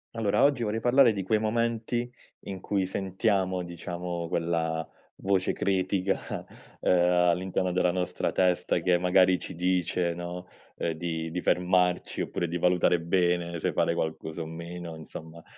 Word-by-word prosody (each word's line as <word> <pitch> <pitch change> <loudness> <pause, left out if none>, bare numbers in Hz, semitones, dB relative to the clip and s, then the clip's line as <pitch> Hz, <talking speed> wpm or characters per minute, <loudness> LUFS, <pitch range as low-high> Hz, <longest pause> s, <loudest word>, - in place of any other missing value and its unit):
Allora, 110 -3 +1
oggi 140 -4 +3
vorrei 110 0 -1
parlare 120 +1 +5
di 100 -2 -3
quei 100 +4 +1
momenti 115 +2 -1 0.4
in 95 -2 -6
cui 100 -2 0
sentiamo, 95 0 0
diciamo, 85 0 -5
quella 80 -1 -1 0.3
voce 95 -1 +1
critica, 95 0 0 0.6
uhm, - - -1
all'interno 90 +1 +2
della 90 -1 +2
nostra 90 0 -1
testa 90 -1 +2
che 90 -1 +3
magari 90 +1 +4
ci - - -7
dice, 90 0 0
no, 90 +1 -6 0.3
uhm, 85 - -1
di 80 0 -3
di 90 +2 -3
fermarci 90 0 +1
oppure 85 - -2
di 85 +1 -2
valutare 90 0 +3
bene 85 -1 +1
se - - -1
fare - - +2
qualcosa 80 0 -3
o - - -4
meno, 85 +1 -7
insomma. 80 +1 -10
90 Hz, 145 wpm, -28 LUFS, 85-95 Hz, 0.6 s, parlare